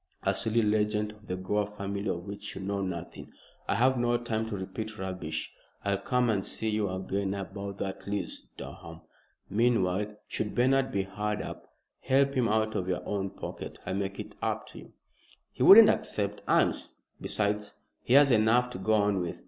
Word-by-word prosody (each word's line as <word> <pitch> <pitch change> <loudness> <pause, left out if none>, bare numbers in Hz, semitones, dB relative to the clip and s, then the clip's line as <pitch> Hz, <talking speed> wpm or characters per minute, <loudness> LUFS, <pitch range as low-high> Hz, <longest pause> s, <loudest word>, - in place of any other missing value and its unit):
"A - - +2
silly 115 +1 +1
legend 105 0 +1
of 105 0 -18
the 90 - -2
Gore 100 +3 -1
family 100 0 -4
of 85 -1 -2
which 100 0 -6
you - - -6
know 100 +1 -2
nothing. 90 -3 -5 0.4
I - - +1
have 130 +3 +3
no 120 0 +2
time 115 -2 -2
to 105 -2 -4
repeat 110 +4 -5
rubbish. 90 -5 -4 0.3
I'll 100 -1 +1
come 125 +4 +1
and 100 -3 0
see 110 - -3
you 105 -2 0
again 95 +1 -2
about 100 0 -6
that 95 0 -5
lease, 100 -3 -4
Durham. - - -9 0.5
Meanwhile, 105 -2 +1
should 105 -1 -3
Bernard 130 +2 +3
be 100 -4 0
hard 105 +2 -3
up, - - -9 0.2
help 140 +1 +2
him 125 -4 +2
out 110 0 +1
of 90 - -2
your 90 -1 -2
own 100 -1 -1
pocket. - - -7
I'll - - -2
make 100 0 -3
it - - -7
up - - -1
to - - -11
you." - - -14 0.6
"He - - -10
wouldn't 215 +2 +10
accept 105 0 -2
alms. - - +2 0.3
Besides, 105 0 -1 0.3
he 125 - +2
has 140 -1 +7
enough 120 +2 +4
to 95 - -6
go 110 +3 +1
on 105 -2 +3
with. 85 - -4
105 Hz, 185 wpm, -29 LUFS, 95-110 Hz, 0.6 s, wouldn't